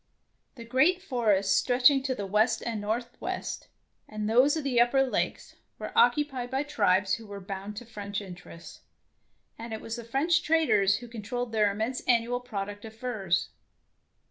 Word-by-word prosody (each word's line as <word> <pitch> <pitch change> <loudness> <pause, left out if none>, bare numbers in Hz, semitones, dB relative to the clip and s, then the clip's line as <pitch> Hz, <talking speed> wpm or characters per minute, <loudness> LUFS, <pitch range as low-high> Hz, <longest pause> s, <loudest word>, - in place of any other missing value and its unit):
The 235 -3 -10
great 270 +10 +3
forests 210 - +1
stretching 255 +5 +4
to 260 -1 -2
the 200 - -4
west 210 +4 +1
and 225 -3 -3
northwest, 235 +4 -4 0.4
and 215 0 -4
those 255 +7 +4
of 310 - -3
the 250 -4 +3
upper 270 +3 +4
lakes, 260 - -3 0.2
were - - -7
occupied 295 - +2
by 265 +2 -1
tribes 195 -10 +2
who 225 -2 -3
were 200 -1 -7
bound 195 +1 -7
to 245 - -7
French 205 -3 -5
interests, 180 -3 -11 0.8
and 230 0 -6
it 220 - -4
was 225 +2 -6
the 235 - -7
French 275 +8 +1
traders 215 -12 +3
who 240 +4 -7
con 230 -2 -8
trolled 245 +2 -4
their 210 -2 +2
immense 220 +5 -3
annual 240 0 +2
product 205 -4 -6
of 220 -1 -10
furs. 215 -7 -1
230 Hz, 170 wpm, -28 LUFS, 205-255 Hz, 0.8 s, stretching